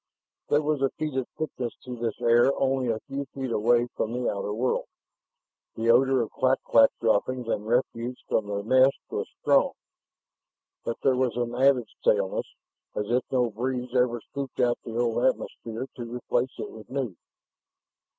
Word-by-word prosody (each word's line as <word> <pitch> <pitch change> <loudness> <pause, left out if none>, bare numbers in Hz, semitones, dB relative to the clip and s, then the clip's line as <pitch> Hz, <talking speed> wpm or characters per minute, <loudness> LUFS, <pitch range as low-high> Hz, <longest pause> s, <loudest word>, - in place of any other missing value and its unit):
There 150 +1 +3
was 150 -2 0
a 135 - +3
fetid 135 -5 -2
thickness 130 -6 -3
to 125 -1 -6
this 115 -2 -3
air 120 +3 +5
only 135 -1 +1
a 110 -1 0
few 140 0 -5
feet 135 -2 -3
away 120 +2 +3
from 110 - -2
the 125 0 0
outer 100 0 -3
world. 120 +4 0 0.9
The 115 +1 +3
odor 130 +1 +4
of 110 - -7
clak 130 0 +2
clak 115 -1 +6
droppings 120 +2 +1
and 105 -2 -2
refuse 120 +1 0
from 105 - 0
their 100 0 -3
nests 130 +4 +5
was - - -3
strong, - - +4 1.1
but 115 - -3
there 130 - +4
was 125 -2 0
an 120 -1 -1
added 130 -1 +4
staleness, 100 -2 +1 0.5
as 105 +2 -2
if 125 +1 +2
no 125 -3 +2
breeze 125 +2 -3
ever 125 -1 +2
scooped 140 +2 -7
out 120 -1 +2
the 115 -1 -5
old 120 0 +1
atmosphere 120 -2 -1
to 120 -2 -6
replace 125 +1 -1
it - - -5
with 110 -1 -12
new. 130 -8 -3
120 Hz, 170 wpm, -27 LUFS, 115-130 Hz, 1.1 s, clak